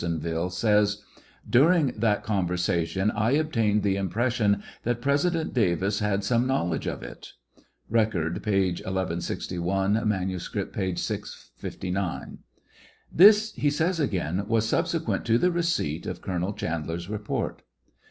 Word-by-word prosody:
onville, 85 +1 -2
says: 105 +2 +2 0.4
During 150 +1 +4
that 105 -2 +1
conversation 90 0 0
I 110 +4 +1
obtained 115 -9 +1
the 100 -1 +1
impression 105 +1 +1 0.2
that 120 0 -1
President 150 +5 0
Davis 100 -2 +1
had 105 -1 0
some 120 +4 +1
knowl' 110 -10 0
edge - - -3
of - - -4
it. - - -10 0.5
(Record, 105 -8 0
p. 95 -3 +2
1161; 95 +2 -1
manuscript, 95 -3 -3
p. 95 -3 -1
659.) 90 +1 -5 0.4
" - - -28
This," 215 +2 +7
he 145 - +1
says 165 +4 0
again, 95 - -1
" - - -15
was 115 0 +1
subsequent - - 0
to 115 0 +3
the 180 +8 +2
receipt 170 - -1
of 90 -1 -4
Colonel 90 +1 -2
Chandler's 85 -3 -4
report." 105 0 -3
105 Hz, 130 wpm, -26 LUFS, 90-120 Hz, 0.5 s, This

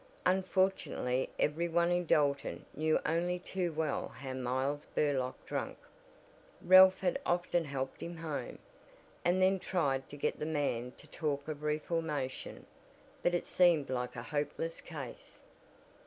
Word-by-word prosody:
Unfortunately 185 -9 +1
every 165 +3 +1
one 170 +1 +2
in 175 -1 +1
Dalton 140 -2 +1
knew 155 +1 +2
only 175 +2 +1
too 180 -1 -2
well 155 -2 -1
how 130 -1 -7
Miles 130 +3 -1
Burlock 135 -4 0
drank. - - -3 0.8
Ralph 185 +1 +8
had 180 -2 0
often 175 -1 +1
helped 135 -2 -4
him 170 0 -6
home, 160 -3 -4 0.7
and 175 +2 +3
then 190 +1 +4
tried 140 -8 0
to 145 - -9
get - - -1
the - - -2
man 140 -6 -1
to - - -14
talk 145 -2 -3
of 150 -2 -5
reformation, 150 -3 -2 0.6
but 175 - +2
it 175 - -1
seemed 170 -7 +3
like 125 -1 -2
a 115 - -5
hopeless 150 +4 -3
case. 145 -7 -9
155 Hz, 140 wpm, -33 LUFS, 140-175 Hz, 0.8 s, Ralph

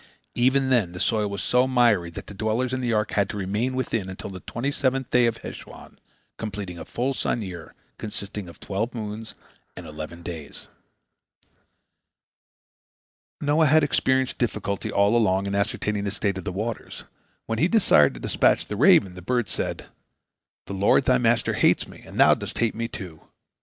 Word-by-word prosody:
Even 130 +2 +2
then 105 -9 +2
the 90 - -7
soil 105 -1 +1
was 100 -3 -4
so 125 +1 +3
miry 120 -9 +3
that 85 - -8
the - - -10
dwellers 110 +5 -1
in 130 - -1
the 120 -2 0
ark 105 -2 0
had 100 -1 +1
to - - -5
remain 105 +7 -1
within 115 -6 -2
until 95 +1 -7
the 95 - -7
twenty 125 +9 -3
seventh 130 -2 -1
day 125 -1 +5
of 115 - -1
Heshwan, - - -10 0.4
completing 100 -5 -5
a - - -7
full 130 +3 -1
sun 120 -3 -1
year, 85 -4 -8 0.2
consisting 100 -2 -6
of 85 - -14
twelve 110 +5 -3
moons 110 0 -6 0.4
and - - -8
eleven 80 +3 -8
days. 80 -5 -5 2.7
Noah 150 +2 +3
had 155 +2 +5
experienced 130 -2 +1
difficulty 105 -4 -2
all 100 +3 +3
along 100 -4 +2
in 100 - -3
ascertaining 100 +1 -1
the - - 0
state 100 -1 -1
of - - -9
the 100 - -2
waters. 110 +5 -5 0.4
When 115 0 -2
he 165 - +4
desired 75 - +4
to - - -8
dispatch - - +2
the - - -5
raven, 95 -2 +5
the 90 - -10
bird 120 +3 0
said: 90 - -3 0.8
"The - - -6
Lord, 100 +7 +3
thy 125 -1 +4
Master, 120 -1 +2
hates - - +3
me, - - -13
and - - -8
thou - - +7
dost - - -5
hate 115 -2 +1
me, 115 +1 -3
too. 90 -9 -9
105 Hz, 180 wpm, -25 LUFS, 95-125 Hz, 2.7 s, thou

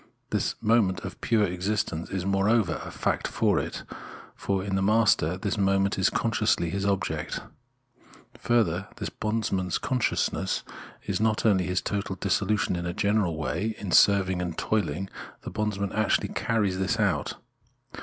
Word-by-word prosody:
This - - 0
moment 105 -5 +3
of - - -8
pure 110 -2 +2
self 90 -3 0
existence 90 -3 -2
is 95 -1 -3
moreover 100 -2 +2
a - - -7
fact - - -1
for - - +2
it; - - -5 0.5
for 95 -1 -2
in 95 -1 -2
the 95 - +1
master 100 -5 +3
this 100 +1 -2
moment 95 0 +2
is 95 - +4
consciously 110 -7 +1
his 100 +2 -1
object. 100 -1 -1 1.0
Further, 100 -6 +1
this - - -4
bondsman's 105 -5 -1
consciousness 125 -3 0 0.4
is - - -1
not 110 0 +1
only 95 -5 +3
this 90 0 0
total 100 -1 -2
dissolution 105 +1 0
in 85 0 -3
a 85 - -4
general 100 -5 +1
way; 90 +8 -2
in 100 -5 -5
serving 95 -1 +4
and 85 -2 -4
toiling, 95 -4 -1 0.4
the - - -6
bondsman 105 -2 -2
actually 110 -2 +1
carries 100 -5 0
this 95 +4 0
out. 90 -10 +1
100 Hz, 155 wpm, -27 LUFS, 90-105 Hz, 1.0 s, is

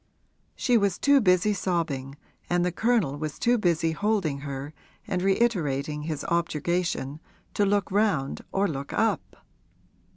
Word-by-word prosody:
She 245 -3 +3
was 200 -3 +1
too 280 -1 +4
busy 185 +1 +3
sobbing 165 -8 -2 0.3
and 175 0 +2
the 180 - 0
Colonel 210 - +1
was 155 -1 -4
too 240 0 +2
busy 165 -4 +1
holding 190 -6 0
her 140 +1 -6 0.3
and 180 - -2
reiterating 155 - +1
his 155 -1 -4
objurgation, 170 -3 -1 0.3
to 205 - +2
look 200 -1 +1
round 195 -10 +1
or 195 +1 +1
look 140 -4 -5
up. 225 +1 -1
175 Hz, 135 wpm, -26 LUFS, 150-205 Hz, 0.3 s, too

